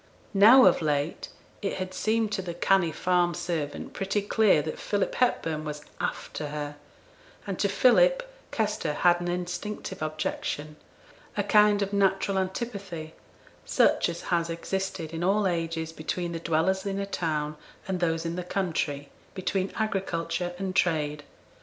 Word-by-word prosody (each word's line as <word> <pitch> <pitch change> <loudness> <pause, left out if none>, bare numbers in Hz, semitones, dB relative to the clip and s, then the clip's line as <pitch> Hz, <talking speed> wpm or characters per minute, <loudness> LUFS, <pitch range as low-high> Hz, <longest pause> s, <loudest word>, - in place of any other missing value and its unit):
Now, 225 +6 +8
of - - +5
late, 150 0 -1 0.3
it 195 - -1
had 185 0 -4
seemed 220 +1 0
to 195 - -1
the 175 -2 -6
canny 180 -1 +3
farm 175 0 +1
servant 155 -5 -3
pretty 195 +1 -1
clear 205 -7 +4
that 155 - -5
Philip 205 -2 -1
Hepburn 165 -11 0
was 150 -1 -5 0.2
'after 150 - -3
her'; 145 0 -5 0.7
and 195 -3 -4
to 200 - +2
Philip, - - +4 0.2
Kester 210 -8 -1
had 175 +3 +3
an 175 - -3
instinctive 180 +2 -4
objection, 155 -1 -3 0.6
a - - +2
kind 210 -1 +5
of 200 +1 -4
natural 195 0 +2
antipathy 190 -5 -4 0.5
such - - +3
as - - -5
has 170 -1 +1
existed 170 -1 -3
in 165 +1 -3
all 200 +3 +2
ages 165 -2 -2
between 170 +2 -3
the 165 - -4
dwellers 165 +4 +1
in 195 -1 -2
a 200 - -1
town 155 -5 -2 0.3
and 190 -2 -1
those 165 -1 0
in 165 0 -2
the 180 - -3
country, 160 -6 -2 0.3
between 190 0 -1
agriculture 180 -4 -2
and 190 0 -3
trade. 150 -5 +1
180 Hz, 150 wpm, -27 LUFS, 160-195 Hz, 0.7 s, Now